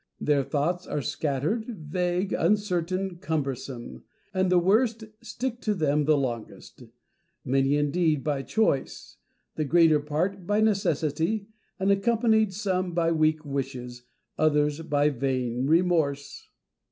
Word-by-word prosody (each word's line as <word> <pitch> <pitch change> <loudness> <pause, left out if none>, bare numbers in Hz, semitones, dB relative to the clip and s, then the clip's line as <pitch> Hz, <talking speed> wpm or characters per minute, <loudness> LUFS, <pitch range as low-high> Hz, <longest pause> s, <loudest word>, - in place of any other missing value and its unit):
Their 145 -2 +2
thoughts 165 +6 -1
are 145 - -2
scattered, 150 - -1
vague, 180 +4 -2
uncertain, 185 -2 0
cumbersome: 135 - -4 0.3
and 185 0 +1
the 180 - +5
worst 220 +5 +2 0.2
stick 240 +1 -4
to 210 -1 0
them 150 -3 +1
the 155 0 +4
longest; 120 -5 -5 0.6
many 135 +2 +2
indeed 150 0 +1
by 145 -3 -1
choice, 180 -4 -1 0.4
the 155 - 0
greater 160 +1 +4
part 170 +6 -2
by 205 +1 +2
necessity, 195 -1 0 0.3
and 195 +1 +2
accompanied, 220 0 +2
some 185 -3 -2
by 165 -1 +2
weak 155 -1 +1
wishes, 130 -3 -5 0.4
others 150 0 +2
by 150 -2 +2
vain 130 -1 -1
remorse. 155 -4 +1
160 Hz, 120 wpm, -26 LUFS, 140-190 Hz, 0.6 s, the